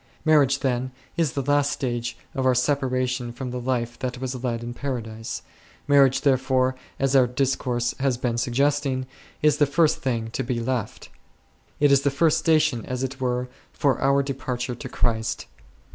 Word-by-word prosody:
Marriage, 140 -4 +4
then, 130 -1 0 0.3
is 165 -6 +1
the 140 - -2
last 145 +1 +2
stage 120 -3 -3 0.2
of 130 - -2
our 130 -1 +3
separation 130 -2 0
from 125 +1 -6
the 125 - -3
life 120 -2 -2
that 125 -1 -3
was 130 -1 -4
led 120 -2 -2
in 120 0 -5
Paradise; 115 -5 -5 0.4
marriage 135 -2 +5
therefore, 130 -1 +2 0.3
as 135 0 +1
our 130 -2 +6
discourse 125 -1 0
has 135 -2 +1
been 120 -1 -1
suggesting, 130 +2 +1 0.4
is 150 -1 +4
the 145 - +4
first 155 +2 +2
thing 115 -4 -2
to 135 - -2
be 125 -2 -2
left; 120 -1 -3 0.7
it 145 -1 +4
is 140 -1 +5
the 140 - +2
first 150 +3 +2
station 155 -7 +2
as 125 0 -3
it 130 0 -4
were 125 0 0 0.3
for 140 -2 +1
our 140 +1 +3
departure 125 -2 -3
to 120 - -8
Christ. 115 -2 -1
130 Hz, 170 wpm, -24 LUFS, 125-140 Hz, 0.7 s, our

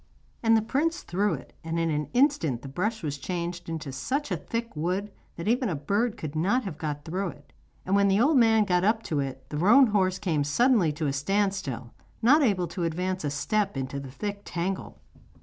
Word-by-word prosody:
And 225 -1 +5
the 220 - +1
prince 315 +9 0
threw 200 +4 0
it, - - -12
and 165 +1 -3
in 165 -1 +1
an 150 -1 -1
instant 240 - +2
the - - -6
brush 205 +11 -2
was 145 -2 -3
changed 175 +2 -4
into 160 -3 -4
such 265 - -2
a - - +2
thick 230 -3 -4
wood 185 +6 -2 0.2
that 170 - -6
even 245 +1 +2
a 170 - -1
bird 205 +11 0
could 155 -1 -6
not 200 +11 +2
have 185 -8 -6
got 145 -2 -4
through 185 +4 -2
it, 145 -4 -11 0.3
and 190 - +1
when 200 0 +4
the 195 +1 +3
old 285 +5 +4
man 225 -3 +5
got 180 -3 +1
up 220 +3 +2
to 150 - -1
it 135 -1 -4
the 150 - -3
roan 215 - +7
horse 190 -4 +1
came 160 -8 0
suddenly 205 - +3
to 155 +1 -3
a 140 - 0
stand 195 +8 +1
still, 125 -10 -5 0.3
not 270 +8 +5
able 200 -9 +2
to 175 - -4
advance 180 +2 -2
a 145 - 0
step 190 +5 -1
into 135 +1 -3
the 135 -1 -8
thick 200 +9 -5
tangle. 185 +2 -4
185 Hz, 220 wpm, -27 LUFS, 150-220 Hz, 0.3 s, roan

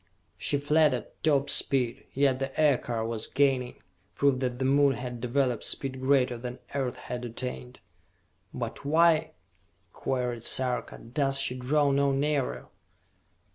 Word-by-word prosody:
She 145 - 0
fled 150 0 +3
at 120 - -9
top 145 -3 +3
speed, 125 -5 0
yet 135 -1 +2
the 135 +1 -4
Aircar 125 -6 +2
was 115 -1 -4
gaining, 135 -3 0 0.3
proof 140 -2 +2
that 125 -2 -2
the 130 - -1
Moon 140 +1 +4
had 125 -1 -6
developed 125 -1 0
speed 130 -1 -1
greater 130 -3 +2
than 125 +1 -6 0.2
Earth 135 -3 -1
had 125 0 -6
attained. 110 - -6 0.7
"But - - -5
why," 160 +1 +3 0.6
queried 125 -3 -2
Sarka, 125 +1 0
"does 135 +3 -1
she 135 -2 0
draw 140 +3 +1
no 140 0 +2
nearer?" 140 0 -1
130 Hz, 135 wpm, -28 LUFS, 125-140 Hz, 0.7 s, Moon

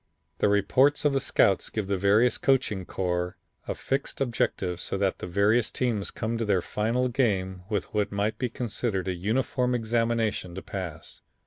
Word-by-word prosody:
"The - - +3
reports 130 +9 +3
of 145 - +4
the 135 - +2
scouts 100 -7 +2
give 110 -2 -2
the 100 +1 0
various 100 +6 +3
coaching 125 -9 +1
corps 90 -1 -2 0.3
a - - -2
fixed 135 +1 -3
objective 100 -8 -1
so - - -3
that 95 -1 0
the - - -5
various 105 +6 +3
teams 115 -6 -1
come 115 +1 -3
to - - 0
their 95 -4 +2
final 115 +4 0
game 100 -8 0
with 105 -4 -2
what 105 -1 0
might 100 +2 -1
be 125 - 0
considered 110 -5 -2
a 95 - 0
uniform 125 +6 0
examination 115 -5 0
to 95 - -5
pass. 85 -5 -7
105 Hz, 175 wpm, -27 LUFS, 95-120 Hz, 0.3 s, of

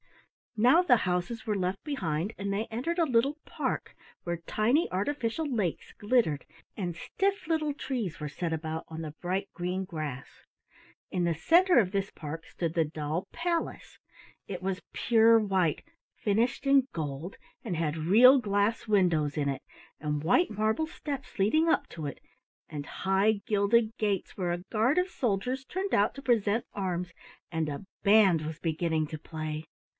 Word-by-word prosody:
Now 250 +10 +6
the 265 -10 +5
houses 180 +5 -2
were 215 - 0
left 185 0 -1
behind 190 - -2
and 200 0 -3
they 205 +3 -1
entered 255 +11 -3
a 335 - +4
little 265 +1 +2
park, - - -3 0.3
where 175 0 -2
tiny 245 +10 +2
artificial 230 - -1
lakes 215 - -2
glittered 205 - +1 0.3
and 180 -4 -3
stiff 390 - -1
little 310 -3 +1
trees 245 - -3
were 150 - -3
set 165 +4 -3
about 160 0 -3
on 160 0 -6
the 155 - -5
bright 190 +3 -1
green 180 +2 -2
grass. 155 -7 -5 0.8
In 180 - 0
the 170 -1 +1
center 345 - +5
of 190 -5 +1
this 195 -1 -1
park 160 +1 -7
stood 165 -2 -3
the 165 -2 +3
doll 155 +2 -3
palace. 340 -1 -3 0.5
It 185 -3 -5
was 190 0 -2
pure 230 -1 +5
white, 190 -7 +1 0.3
finished 225 +6 0
in 275 -1 +5
gold, 155 +3 -5 0.3
and 185 -8 -3
had 155 -2 0
real 225 - +7
glass 205 +1 0
windows 175 -8 +2
in 145 -2 +1
it, 135 -1 -2 0.4
and 150 -1 -1
white 200 - +3
marble 220 +8 0
steps 280 - -6
leading 310 +12 +3
up - - +2
to 155 -3 -5
it, 140 - -7 0.5
and 145 -2 -6
high 195 +2 +1
gilded 215 +2 +2
gates 205 -4 -1
where 180 -3 -1
a 175 - 0
guard 230 +7 +2
of 360 +1 +2
soldiers 250 - -1
turned 380 +8 -3
out 205 +2 +3
to 275 - -8
present 225 -3 +2
arms, 180 -3 -3 0.4
and 160 -2 -1
a 145 +6 -6 0.2
band 200 -5 +6
was 160 +1 -5
beginning 160 -1 0
to 155 0 -7
play. 155 -1 -5
195 Hz, 165 wpm, -29 LUFS, 165-240 Hz, 0.8 s, real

